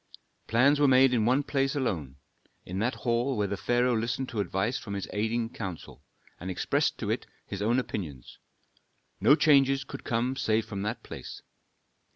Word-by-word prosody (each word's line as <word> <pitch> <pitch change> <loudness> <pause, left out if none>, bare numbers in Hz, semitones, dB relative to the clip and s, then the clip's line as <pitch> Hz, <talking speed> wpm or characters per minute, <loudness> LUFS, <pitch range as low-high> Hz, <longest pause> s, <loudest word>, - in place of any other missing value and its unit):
Plans 135 +6 +4
were 145 - +5
made 130 0 +6
in 110 -3 +2
one 130 +4 +3
place 135 0 0
alone, 85 - -2 0.5
in 90 +2 -4
that 120 +5 0
hall 120 +2 +1
where 105 - +1
the 100 0 -2
pharaoh 120 +4 +1
listened 115 +3 -2
to 115 - -4
advice 100 +5 -1
from 100 -2 -6
his 100 - -4
aiding 110 +2 0
council, 90 - -7 0.4
and 90 - -6
expressed 90 - 0
to - - -2
it - - -2 0.2
his 100 - -6
own 115 +4 +2
opinions. 100 - -5 0.8
No 145 - +6
changes 140 -3 +4
could - - -9
come 120 +3 0
save 110 -3 +1
from 100 -1 -5
that 105 +4 -3
place. - - -9
115 Hz, 175 wpm, -28 LUFS, 100-130 Hz, 0.8 s, made